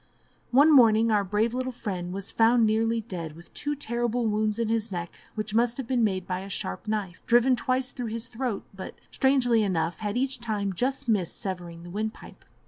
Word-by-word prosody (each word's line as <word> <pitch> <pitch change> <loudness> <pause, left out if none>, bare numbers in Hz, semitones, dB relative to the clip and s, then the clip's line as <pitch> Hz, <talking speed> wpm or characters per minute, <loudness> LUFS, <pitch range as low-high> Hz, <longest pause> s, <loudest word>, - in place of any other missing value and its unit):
One 285 +5 +6
morning 225 -3 +6
our 205 -2 +3
brave 210 +4 0
little 255 +1 -2
friend 185 -7 -4
was 195 +1 -4
found 230 +1 +4
nearly 225 +1 +1
dead, 170 -8 -6
with 170 +1 -15
two 295 0 -2
terrible 240 -3 -1
wounds 215 0 0
in 230 -1 0
his 225 -1 -1
neck, 175 -2 -4 0.2
which 215 -1 -4
must 235 +1 +2
have 265 - -4
been 250 -2 +1
made 190 -4 0
by 185 -1 -2
a 195 +1 -8
sharp 95 - -4
knife, 205 -4 -3
driven 245 +2 +5
twice 255 +1 -1
through 245 -3 -5
his 225 +1 -4
throat, 235 -3 -3
but, 190 -1 -8 0.2
strangely 255 -4 +3
enough, 170 -4 -1
had 210 +1 -2
each 265 0 0
time 210 -4 -2
just 265 +6 -2
missed 200 -7 0
severing 175 -3 -5
the 175 - -9
wind 215 +3 -2
pipe. - - -14
220 Hz, 205 wpm, -27 LUFS, 195-240 Hz, 0.2 s, One